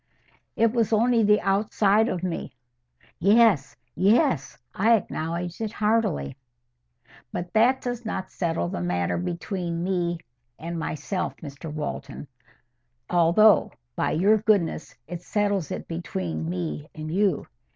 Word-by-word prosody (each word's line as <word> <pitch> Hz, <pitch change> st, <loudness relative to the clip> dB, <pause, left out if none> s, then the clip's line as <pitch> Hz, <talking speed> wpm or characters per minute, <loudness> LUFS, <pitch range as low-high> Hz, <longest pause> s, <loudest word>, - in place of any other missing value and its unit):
"It 230 Hz, 0 st, +3 dB
was 230 Hz, -3 st, +1 dB
only 230 Hz, +2 st, +3 dB
the 210 Hz, 0 st, +4 dB
outside 205 Hz, +2 st, +2 dB
of 180 Hz, -1 st, -3 dB
me." 180 Hz, -2 st, -4 dB, 0.7 s
"Yes, 200 Hz, -6 st, +4 dB, 0.2 s
yes; 195 Hz, -, +2 dB, 0.2 s
I 225 Hz, +4 st, +4 dB
acknowledge 170 Hz, -1 st, -3 dB
it 220 Hz, -1 st, -3 dB
heartily." 210 Hz, -, 0 dB, 1.0 s
"But 175 Hz, 0 st, -5 dB
that 240 Hz, +4 st, +4 dB
does 245 Hz, -1 st, -4 dB
not 190 Hz, -4 st, -4 dB
settle 165 Hz, -, -1 dB
the 85 Hz, -, -4 dB
matter 90 Hz, 0 st, -1 dB
between 170 Hz, -, -3 dB
me 175 Hz, -2 st, 0 dB, 0.4 s
and 170 Hz, +1 st, -5 dB
myself, 155 Hz, +5 st, -3 dB
Mr 145 Hz, 0 st, -8 dB
Walton; 150 Hz, -2 st, -5 dB, 0.8 s
although, 175 Hz, +3 st, +5 dB, 0.2 s
by -, -, 0 dB
your 200 Hz, +7 st, +4 dB
goodness, 200 Hz, -7 st, 0 dB
it 175 Hz, 0 st, -7 dB
settles 200 Hz, -4 st, 0 dB
it -, -, -5 dB
between 85 Hz, -, -4 dB
me 80 Hz, -5 st, -4 dB
and 155 Hz, +1 st, -5 dB
you. 195 Hz, 0 st, +1 dB
180 Hz, 125 wpm, -25 LUFS, 155-215 Hz, 1.0 s, although